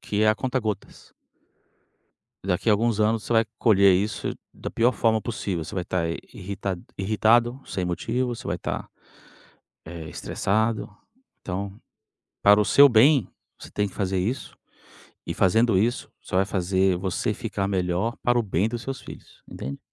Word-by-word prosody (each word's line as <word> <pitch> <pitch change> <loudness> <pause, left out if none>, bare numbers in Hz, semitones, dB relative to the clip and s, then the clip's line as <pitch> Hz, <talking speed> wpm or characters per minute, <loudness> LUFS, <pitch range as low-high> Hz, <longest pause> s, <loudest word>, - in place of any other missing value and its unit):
que 105 +1 -1
é 110 - +4
a 110 - +5
conta 130 +2 -1
gotas. 110 -2 -6 1.3
Daqui 95 +3 0
a 105 - +6
alguns 110 0 +1
anos, 110 0 +2
você - - -2
vai 115 0 +4
colher 100 -4 +5
isso 100 +4 -1 0.2
da - - -7
pior 120 +2 +3
forma 110 -3 +1
possível. 100 -7 -3
Você 95 +6 -8
vai 90 -2 -2
tá 90 - -1 0.3
irritad 100 -1 -4 0.2
irritado 115 +6 +2
sem 90 -2 -3
motivo, 120 +8 -1
você - - -9
vai - - -1
tá, - - -4 1.0
eh, 80 -1 -8
estressado, 110 +3 -1 0.5
então, 100 +2 -5 0.6
para 105 +1 +6
o - - +4
seu 140 +8 +7
bem, 125 - +5 0.3
você - - -10
tem 105 0 0
que - - -12
fazer 95 -2 -1
isso. 110 +9 -3 0.7
E, - - -2
fazendo 110 +2 +3
isso, 115 +5 0
só 90 - -4
vai 95 - +4
fazer 95 -1 +1
você 95 -1 -1
ficar 100 0 -3
melhor 95 +3 -1
para 120 0 +3
o - - +2
bem 100 -1 0
dos 120 0 -5
seus 135 +1 -5
filhos, - - -13
entende? 70 +2 -6
105 Hz, 165 wpm, -25 LUFS, 95-115 Hz, 1.3 s, seu